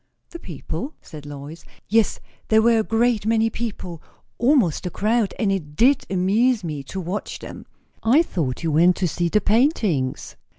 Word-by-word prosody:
"The 340 - -8
people!" 175 - -6
said 150 -3 -11
Lois. 145 +3 -9 0.2
"Yes. 225 0 +2 0.3
There 220 0 +4
were 230 -1 +4
a - - +1
great 225 -1 +1
many 225 0 +2
people; 195 -9 -5 0.4
almost 235 - +2
a - - -2
crowd; 215 +4 0
and 210 -4 +1
it 155 -7 -4
did 260 - +3
amuse 205 +5 +2
me 150 -4 -4
to 190 - -6
watch 185 +4 -4
them." - - -10 0.3
"I 260 +9 +4
thought 150 - -3
you 165 - 0
went 170 +4 +4
to 185 - 0
see 170 +1 -1
the 210 +4 +2
paintings." 210 - 0
200 Hz, 170 wpm, -22 LUFS, 165-230 Hz, 0.4 s, There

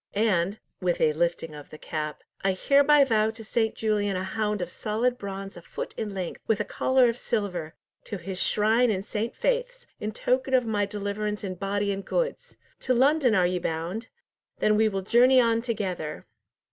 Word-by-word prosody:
"And" 200 -2 +1 0.2
(with 180 -2 0
a 155 - +3
lifting 170 0 -1
of 145 -1 -10
the 155 - -10
cap) 155 -1 -5 0.2
"I 195 0 +2
hereby 285 +8 +5
vow 220 -4 +2
to 225 0 -8
St. 220 0 0
Julian 205 -3 0
a 185 - -2
hound 210 +2 -1
of 175 - -4
solid 230 +4 0
bronze 195 -1 -6
a 175 - -10
foot - - -6
in 215 -2 -3
length, 185 -3 -4
with 220 - +2
a - - +1
collar 260 -1 +3
of 230 0 -1
silver, 180 -8 -2 0.3
to 205 - -5
his 185 +1 -5
shrine 225 +4 +3
in 195 -3 -1
St. 215 +2 -3
Faith's, - - -1
in 210 - -3
token 260 +4 +1
of 250 -2 +3
my 205 -2 0
deliverance 210 +1 -3
in 190 -2 -3
body 200 +2 -1
and 195 0 -3
goods! - - -2 0.2
To 255 - +1
London 265 -1 +4
are 185 -2 +4
ye 180 0 0
bound? 175 +8 -3 0.5
Then 215 - +3
will 220 +1 +4
we 195 -2 -2
journey 250 +5 +5
on 230 -2 +3
together!" 185 -10 -3
210 Hz, 190 wpm, -26 LUFS, 190-235 Hz, 0.5 s, hereby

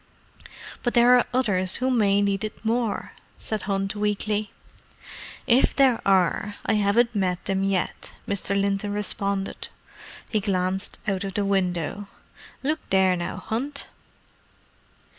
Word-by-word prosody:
"But 240 - -1
there 240 +1 +7
are 245 - +4
others 200 -8 +1
who 260 +1 +1
may 205 -4 +3
need 200 0 0
it 215 +1 -6
more," 230 -1 -1 0.2
said 215 -2 -3
Hunt 195 0 -1
weakly. 210 0 -1 0.9
"If 245 +2 +3
there 265 -4 +4
are, 195 +2 +2
I - - +2
haven't 215 +3 +3
met 185 -4 -1
them 195 -1 0
yet," 195 -2 -1 0.2
Mr. 200 0 0
Linton 200 +1 0
responded. 200 -1 -2 0.6
He 215 - +2
glanced 190 -1 -1
out 195 -1 0
of 195 -1 -5
the 205 - 0
window. 190 0 -1 0.6
"Look 305 +3 0
there 190 -1 +4
now, 175 -1 -4
Hunt!" 275 +6 -3
200 Hz, 130 wpm, -25 LUFS, 195-220 Hz, 0.9 s, there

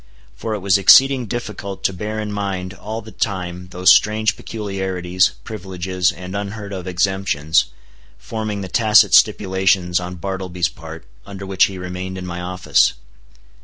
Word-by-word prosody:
For 110 -1 -4
it 105 - -6
was 100 +1 +3
exceeding 130 +5 +6
difficult 105 -3 -6
to 95 - +1
bear 105 +4 -4
in 105 -1 -4
mind 95 -2 -3
all 110 +3 -6
the 110 - -11
time 90 -4 -3
those 90 0 +5
strange 110 +1 +1
peculiarities, 95 -4 -1
privileges, 95 -3 -2
and 90 +2 -8
unheard 100 0 -5
of 95 -1 -6
exemptions, 90 -4 +1 0.5
forming 110 -2 -4
the 95 - -5
tacit 110 +3 +4
stipulations 95 -2 +3
on 90 0 -6
Bartleby's 90 -2 -3
part 80 0 -11 0.2
under 100 -1 -9
which 95 -1 +3
he 95 - -6
remained 90 +1 -6
in 90 - -6
my 90 0 -5
office. 90 -6 +2
95 Hz, 150 wpm, -20 LUFS, 90-105 Hz, 0.5 s, exceeding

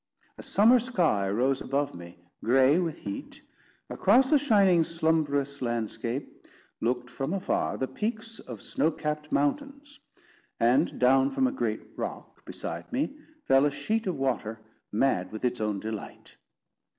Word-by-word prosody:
A - - -6
summer 230 +5 +5
sky 175 - +1
rose 130 +6 +1
above 140 +1 -1
me, 85 0 -11 0.3
gray 135 +6 +4
with 170 -4 -2
heat; 100 -1 -7 0.4
across 255 +8 +3
a 300 - +7
shining 200 - +4
slumberous 155 -4 0
landscape, 120 +2 -3 0.4
looked 125 +2 -1
from 135 +6 -4
afar 195 - -1
the 130 - -1
peaks 220 - -4
of 120 -5 -9
snow 155 - +1
capped 150 -1 -4
mountains; 280 - -2 0.6
and 120 +3 +3
down 130 +2 +4
from 265 - +1
a 260 - +2
great 270 - -2
rock - - -7
beside - - -6
me 280 +2 -1 0.3
fell 135 +1 +4
a 145 - +4
sheet 195 +11 -2
of 180 - -1
water 120 -5 -2 0.3
mad 105 -5 +1
with 110 +3 -4
its 125 -2 -1
own 105 -2 -1
delight. 110 0 -7
140 Hz, 145 wpm, -28 LUFS, 125-200 Hz, 0.6 s, a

